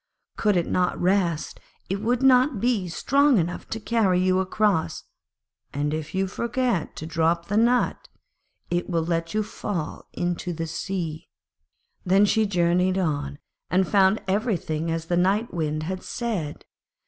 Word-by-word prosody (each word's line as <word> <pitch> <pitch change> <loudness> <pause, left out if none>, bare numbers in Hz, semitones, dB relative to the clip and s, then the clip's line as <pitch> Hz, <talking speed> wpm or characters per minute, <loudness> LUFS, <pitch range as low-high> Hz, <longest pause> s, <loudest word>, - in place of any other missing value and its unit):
Could 210 -3 +2
it 170 - +1
not 180 -1 0
rest, 180 -3 0 0.3
it 195 +2 -2
would 240 +3 0
not 255 -2 +5
be 225 -5 +1
strong 275 - +3
enough 175 -1 -2
to 225 - -3
carry 210 -5 +2
you 185 0 +2
across, 190 -2 0 0.7
and 145 +1 -1
if 155 +2 -5
you 190 0 +1
forget 235 0 -1
to 155 - -6
drop 165 +1 +1
the 205 - 0
nut, 240 +2 +2 0.6
it 175 +1 -1
will 165 -2 0
let 165 +2 -2
you 215 - +2
fall 200 -6 -5
into 175 0 -2
the 165 0 -3
sea.' 165 -1 -4 0.7
Then 195 +2 +4
she 220 +1 +2
journeyed 180 0 +2
on, 145 - -1 0.3
and 185 +1 +2
found 195 +1 +3
everything 185 -6 -1
as 165 0 -2
the 175 +1 0
Night 200 +6 +1
Wind 155 -2 -2
had 185 +3 -4
said. 205 -11 -4
185 Hz, 150 wpm, -25 LUFS, 165-215 Hz, 0.7 s, not